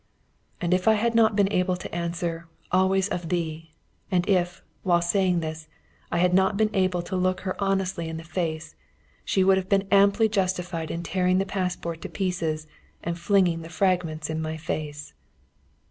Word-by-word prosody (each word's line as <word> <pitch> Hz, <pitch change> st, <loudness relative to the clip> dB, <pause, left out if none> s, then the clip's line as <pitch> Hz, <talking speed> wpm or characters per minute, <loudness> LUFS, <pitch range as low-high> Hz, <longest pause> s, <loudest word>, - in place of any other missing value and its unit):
And 175 Hz, 0 st, +1 dB
if 180 Hz, +2 st, +1 dB
I 220 Hz, -, +6 dB
had 230 Hz, +2 st, +1 dB
not 225 Hz, -2 st, +4 dB
been 200 Hz, -1 st, +3 dB
able 180 Hz, -2 st, +1 dB
to 180 Hz, -, -7 dB
answer, 170 Hz, -1 st, -3 dB, 0.2 s
"Always 190 Hz, +1 st, +3 dB
of 175 Hz, -2 st, -3 dB
thee!" 165 Hz, -2 st, -2 dB, 0.4 s
and 180 Hz, -2 st, +1 dB
if, 180 Hz, -2 st, +1 dB, 0.2 s
while 175 Hz, -2 st, +3 dB
saying 175 Hz, 0 st, +1 dB
this, 160 Hz, 0 st, -5 dB, 0.4 s
I -, -, 0 dB
had 180 Hz, +1 st, +3 dB
not 190 Hz, +2 st, +3 dB
been 215 Hz, 0 st, +2 dB
able 185 Hz, -3 st, +1 dB
to 180 Hz, -, -4 dB
look 185 Hz, 0 st, +1 dB
her 185 Hz, -1 st, -3 dB
honestly 190 Hz, -4 st, -1 dB
in 160 Hz, -, -5 dB
the 165 Hz, -, -7 dB
face, 160 Hz, -2 st, -3 dB, 0.5 s
she 190 Hz, -, +2 dB
would 190 Hz, 0 st, +5 dB
have 190 Hz, -1 st, -3 dB
been 195 Hz, -1 st, +2 dB
amply 200 Hz, +2 st, +5 dB
justified 180 Hz, -5 st, -1 dB
in 170 Hz, -, -4 dB
tearing 185 Hz, 0 st, +1 dB
the 195 Hz, -, +1 dB
passport 180 Hz, -4 st, -3 dB
to -, -, -6 dB
pieces 165 Hz, -5 st, -2 dB, 0.4 s
and 170 Hz, +1 st, -3 dB
flinging 175 Hz, -2 st, +2 dB
the 165 Hz, -, -9 dB
fragments 165 Hz, -3 st, 0 dB
in 160 Hz, 0 st, -3 dB
my 160 Hz, 0 st, -3 dB
face. 150 Hz, -1 st, -5 dB
180 Hz, 180 wpm, -26 LUFS, 165-190 Hz, 0.5 s, I